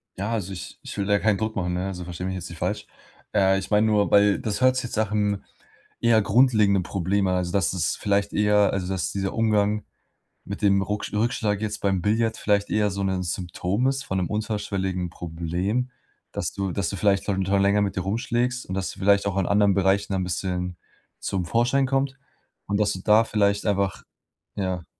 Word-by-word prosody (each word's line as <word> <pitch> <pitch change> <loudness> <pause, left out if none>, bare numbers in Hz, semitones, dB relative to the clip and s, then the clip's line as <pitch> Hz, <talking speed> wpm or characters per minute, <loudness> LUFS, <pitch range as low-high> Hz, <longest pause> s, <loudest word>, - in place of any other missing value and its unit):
Ja, 100 +4 -3
also 100 -5 -2
ich 90 - -8
ich - - -8
will 100 - 0
da 100 0 +3
keinen 105 -1 +2
Druck 110 +1 -2
machen, 90 -2 -1
ne, 90 +2 -2
also 90 -2 -5
versteh 90 +1 -6
mich 95 - -2
jetzt 90 -1 -6
nicht 85 - -9
falsch. - - -2 0.5
Äh, 95 -1 +3
ich 95 - -7
mein 105 +1 +4
nur, 105 -2 +2
weil, 100 0 +5
das 110 +2 -3
hört 130 0 +5
sich 130 -1 -1
jetzt 115 - -5
nach'm 105 -2 0 0.6
eher 115 -2 +4
grundlegenden 105 -5 +4
Problem 95 +2 0
an, 90 - +1
also 90 -1 -1
dass 100 0 +1
es 85 -6 0
vielleicht 100 0 0
eher 105 -1 +3
also, 95 -2 -2
dass 95 -2 -2
dieser 95 -1 -2
Umgang 105 -2 +1 0.6
mit 100 +2 -7
dem 100 -1 +4
Rucksch 105 +1 -3
Rückschlag 110 -2 0
jetzt 105 -1 -3
beim 95 -2 +1
Billard 110 +3 +1
vielleicht 100 -1 +1
eher 105 -1 +2
so 100 +1 -3
'nen 95 -1 -1
Symptom 90 +6 -1
ist 135 0 -1
von 95 -8 -3
'nem 90 - -2
unterschwelligen 100 -4 -2
Problem, 85 +9 -2 0.4
das - - -3
du 100 -1 -2
das 95 -1 -1
du - - -4
vielleicht 100 +1 +1
darunter 95 0 +1
länger 100 +1 +3
mit 100 -1 -1
dir 95 - -1
rumschlägst 120 +5 -1
und 95 - -4
dass 95 -1 -2
du - - -13
vielleicht 100 +1 +3
auch 100 -1 -1
in 95 - +1
anderen 100 -1 +4
Bereichen 100 +1 +1
ein 95 - 0
bisschen 90 0 -3 0.4
zum 95 -3 -2
Vorschein 120 +8 +2
kommt, 135 0 0 0.5
und 100 0 0
dass 105 -1 +2
du 95 - -6
da 110 +1 +5
vielleicht 105 -2 +1
einfach, 100 -2 0 0.5
ja 95 -3 -2
100 Hz, 205 wpm, -24 LUFS, 95-105 Hz, 0.6 s, weil